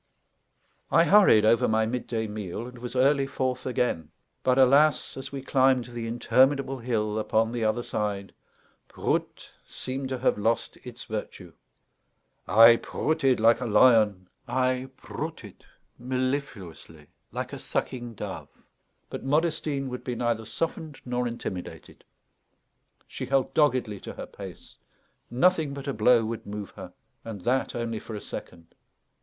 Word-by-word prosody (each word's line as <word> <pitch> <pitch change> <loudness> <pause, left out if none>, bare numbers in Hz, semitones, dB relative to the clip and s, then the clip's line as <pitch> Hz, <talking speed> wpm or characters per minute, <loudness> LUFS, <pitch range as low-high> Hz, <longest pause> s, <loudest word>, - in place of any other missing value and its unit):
I 165 - +5
hurried 170 - +6
over 115 +1 +4
my 110 0 +2
midday 115 -1 -2
meal, 105 0 -5
and 125 0 -10
was 125 +1 -7
early 135 +1 +3
forth 130 -2 -2
again. 120 -11 -1 0.3
But, 130 0 +2
alas, 140 +4 +4
as 135 - -7
we 135 -1 -6
climbed 130 -2 +3
the 120 -2 -6
interminable 130 +3 +2
hill 110 -3 -1
upon 110 +1 +1
the 120 -1 -2
other 110 +2 0
side, 100 -3 -3 0.5
"Proot!" - - -3 0.2
seemed 130 +1 -5
to 130 - -2
have 125 -4 +1
lost 115 +2 0
its 125 -1 -9
virtue. 100 -5 -7 0.9
I 115 +5 +8
prooted 135 -3 0
like 115 +2 +4
a 125 - -2
lion, 105 -5 +4 0.2
I 130 +1 0
prooted - - -7 0.3
mellifluously 125 - -4 0.3
like - - -5
a - - -6
sucking 120 -2 -3
dove; - - -7 0.6
but - - -7
Modestine 150 -1 0
would 125 0 -6
be 125 - -3
neither 115 -1 -1
softened 160 +2 -4
nor 125 0 -1
intimidated. 95 -6 -7 1.0
She - - -6
held 135 -1 +1
doggedly 130 -9 +2
to - - -8
her - - -7
pace; - - -10 0.5
nothing 155 +2 +2
but 140 0 -7
a 140 - -1
blow 115 +1 +4
would 115 -1 -5
move 105 -1 -6
her, - - -10 0.3
and 110 -4 -7
that 130 +6 0
only 115 -2 -3
for 110 - -8
a - - -4
second. 85 -1 -9
120 Hz, 140 wpm, -27 LUFS, 110-130 Hz, 1.0 s, I